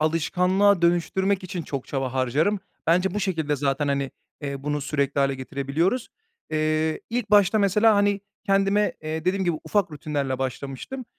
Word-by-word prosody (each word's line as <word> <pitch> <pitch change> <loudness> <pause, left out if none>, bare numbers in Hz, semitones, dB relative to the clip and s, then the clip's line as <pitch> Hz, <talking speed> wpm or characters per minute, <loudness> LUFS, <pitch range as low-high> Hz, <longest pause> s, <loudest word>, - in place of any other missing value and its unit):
alışkanlığa 180 +4 +2
dönüştürmek 190 +3 +2
için 180 -2 -4
çok 140 -4 -5
çaba 135 -2 -2
harcarım. 145 - +1 0.3
Bence 180 +3 +2
bu 210 - -1
şekilde 160 -7 -1
zaten, 140 +1 0
hani, 140 -1 0 0.3
eee, 140 -1 -5
bunu 150 0 -1
sürekli 140 -1 -1
hâle 135 0 +2
getirebiliyoruz. 140 - -1 0.4
Eee, 155 0 0
ilk 235 -3 -2
başta 205 +1 +5
mesela, 210 +3 +4
hani, 205 -1 +2 0.3
kendime, 195 +1 +2
eee, 155 +1 -4
dediğim 190 +1 +1
gibi 175 -3 +1
ufak 200 -5 +1
rutinlerle 140 -3 -3
başlamıştım. 135 - -5
160 Hz, 150 wpm, -24 LUFS, 140-195 Hz, 0.4 s, başta